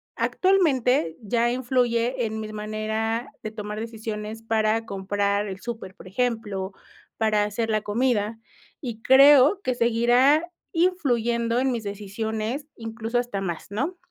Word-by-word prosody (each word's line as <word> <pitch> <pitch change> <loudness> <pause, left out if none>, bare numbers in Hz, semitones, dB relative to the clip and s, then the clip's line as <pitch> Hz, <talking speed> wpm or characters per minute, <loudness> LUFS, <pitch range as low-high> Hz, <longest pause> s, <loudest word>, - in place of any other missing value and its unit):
actualmente 265 - +2
ya 235 +2 +1
influye 245 -1 +1
en 220 0 -3
mis 215 0 -6
manera 220 +3 -2 0.2
de 215 - -4
tomar 210 -1 -5
decisiones 220 -1 -5
para 225 0 +1
comprar 200 0 -1
el 190 -1 -6
súper, 225 -4 -6
por - - -13
ejemplo, 205 -3 -2 0.5
para 215 -2 +2
hacer 215 +2 -2
la 215 -1 +1
comida, 220 0 0 0.4
y 235 -6 -6
creo 280 - +7
que 255 -9 -1
seguirá 245 +7 +3 0.2
influyendo 240 -10 +1
en 265 +1 +1
mis 235 -3 -3
decisiones, 220 +6 -4
incluso 225 +1 -3
hasta 240 -5 -3
más, 175 -4 -4
¿no? 280 - -2
225 Hz, 130 wpm, -25 LUFS, 210-250 Hz, 0.5 s, creo